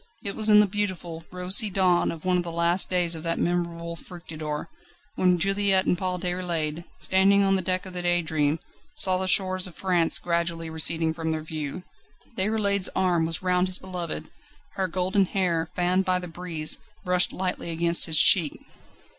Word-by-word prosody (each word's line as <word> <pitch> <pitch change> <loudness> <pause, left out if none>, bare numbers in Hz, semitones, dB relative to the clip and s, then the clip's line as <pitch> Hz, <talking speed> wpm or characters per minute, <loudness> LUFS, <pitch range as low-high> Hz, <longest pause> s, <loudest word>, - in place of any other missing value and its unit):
It 200 -3 -3
was 215 0 +3
in 210 0 +7
the - - +3
beautiful, 185 -5 -4
rosy 185 +4 0
dawn 185 -2 +2
of 165 +1 -10
one 185 0 +2
of - - +1
the 170 - -6
last 170 +2 +1
days 175 -2 +1
of 160 - -6
that 165 0 -2
memorable 170 -1 -2
Fructidor, 155 -3 -7 0.5
when 180 -1 +2
Juliette 195 +1 +2
and - - +1
Paul 180 0 -3
Déroulède, 170 -3 -3
standing 195 +1 +3
on 195 0 +2
the 190 - 0
deck 185 +1 -2
of 185 - -9
the 180 - -3
Daydream, 160 -4 0 0.4
saw 185 -9 +2
the 190 - -2
shores 185 0 +3
of 175 - -12
France 175 -3 +2
gradually 170 -1 -2
receding 160 0 +1
from 160 0 -4
their 155 -1 -3
view. 155 +2 -6 0.5
Déroulède's 200 -1 +1
arm 175 -3 +1
was 165 +2 -2
round 180 0 +1
his 185 0 +4
beloved, 175 - -6 0.4
her 190 -1 -2
golden 185 +3 0
hair, 175 -4 -1
fanned 180 +2 +1
by 185 -1 +1
the 180 0 -6
breeze, 165 -2 -3 0.3
brushed 180 0 +3
lightly 180 -2 -3
against 170 +1 +2
his 160 -2 +6
cheek. 165 -6 +5
180 Hz, 180 wpm, -25 LUFS, 165-185 Hz, 0.5 s, in